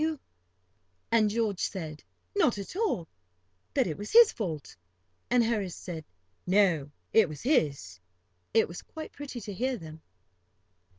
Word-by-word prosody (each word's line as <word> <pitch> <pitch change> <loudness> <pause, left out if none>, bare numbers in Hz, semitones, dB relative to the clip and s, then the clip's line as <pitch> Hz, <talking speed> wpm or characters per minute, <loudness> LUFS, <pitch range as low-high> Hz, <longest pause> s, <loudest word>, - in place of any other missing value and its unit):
[Picture: 315 - +3
Smoking - - -10
pipes] - - -39 1.0
And 215 - +3
George 210 -3 0
said: 160 -5 -4 0.3
"Not 320 - +3
at 200 - -7
all;" 385 - 0 0.7
that - - +4
it 165 +1 -4
was 205 - -5
his 465 -1 +9
fault; 165 - -4 0.5
and 245 -1 +4
Harris 210 -6 -1
said 160 -3 -7 0.4
no, 180 -7 +3 0.2
it 220 -6 +6
was 150 - -8
his. 140 - +1 0.5
It 225 - +4
was 170 - -8
quite 315 0 -8
pretty 285 -4 -7
to 205 0 -6
hear 255 +5 -1
them. 160 -3 -10
205 Hz, 155 wpm, -29 LUFS, 160-245 Hz, 1.0 s, his